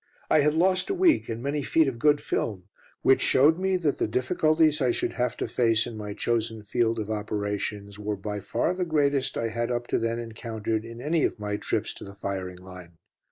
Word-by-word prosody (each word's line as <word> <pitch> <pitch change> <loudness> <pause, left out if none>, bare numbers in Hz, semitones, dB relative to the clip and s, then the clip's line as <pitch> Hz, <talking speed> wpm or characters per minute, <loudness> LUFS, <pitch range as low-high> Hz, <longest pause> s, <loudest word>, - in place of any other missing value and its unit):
I - - +6
had 150 +1 +3
lost 185 - +2
a 390 - 0
week, 355 - +3
and 115 +1 -4
many 145 +1 -1
feet 155 +3 +3
of 125 -3 -3
good 145 +2 +4
film, 100 -5 -2 0.4
which 135 - +5
showed 155 +6 +4
me 190 0 +1
that 155 -6 -1
the - - +1
difficulties 155 +3 +2
I 130 - +3
should 120 - -1
have 125 -1 -1
to - - -2
face 115 -2 +2
in 120 - -7
my 105 -1 -6
chosen 110 -1 -1
field 115 +2 0
of 110 -1 -3
operations 105 -1 -3
were 105 0 -2
by 105 +1 -5
far 100 - -1
the 185 0 -2
greatest 145 -5 +1
I 115 - -1
had 115 +1 -2
up 120 -1 -1
to - - +1
then 115 0 -1
encountered 115 -1 -4
in 115 +1 -9
any 155 +3 +1
of - - -1
my 105 0 -2
trips - - -2
to - - -10
the 100 0 -10
firing 95 -2 -4
line. 90 -1 -12
115 Hz, 215 wpm, -26 LUFS, 105-145 Hz, 0.4 s, I